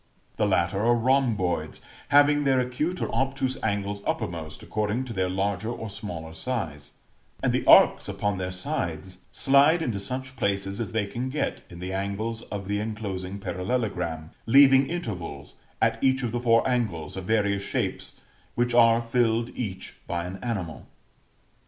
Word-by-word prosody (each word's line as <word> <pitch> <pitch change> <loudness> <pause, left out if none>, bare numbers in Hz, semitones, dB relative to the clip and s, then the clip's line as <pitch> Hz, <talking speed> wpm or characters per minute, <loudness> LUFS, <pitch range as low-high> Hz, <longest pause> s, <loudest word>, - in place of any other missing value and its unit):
The 105 - +2
latter 95 0 +1
are 120 +1 +4
rhomboids, 120 -7 +1 0.3
having 145 +1 +5
their 135 -2 +3
acute 150 +8 -1
or - - -3
obtuse 135 -1 0
angles 100 -1 -2
uppermost 80 -2 -3
according 105 +4 -1
to 120 - -6
their 95 -2 0
larger 100 +2 -1
or 110 -3 -5
smaller 85 -6 -6
size; 80 - -4 0.5
and - - +2
the - - +1
arcs - - +7
upon 105 -2 -1
their 90 0 -2
sides 90 -1 -3
slide 145 +5 +4
into 110 -8 -2
such 130 +6 -4
places 100 -2 -1
as 115 - -4
they 110 -2 0
can 120 +6 -4
get 145 +2 -2
in 85 - -11
the 90 +2 -5
angles 100 +4 -2
of 100 -2 -5
the 105 0 0
enclosing 100 -3 -4
parallelogram, 90 -4 -3 0.2
leaving 135 +2 +7
intervals, 90 - -5 0.3
at - - +1
each 135 0 +3
of 120 - -1
the 120 - -1
four 115 0 +3
angles, 105 - -1
of 95 -1 -6
various 100 -2 +1
shapes, - - -3 0.3
which 120 0 +1
are 115 -1 +5
filled 115 0 +1
each 95 -6 -6
by 85 0 -2
an 90 +2 -6
animal. 90 - -4
105 Hz, 160 wpm, -26 LUFS, 95-125 Hz, 0.5 s, arcs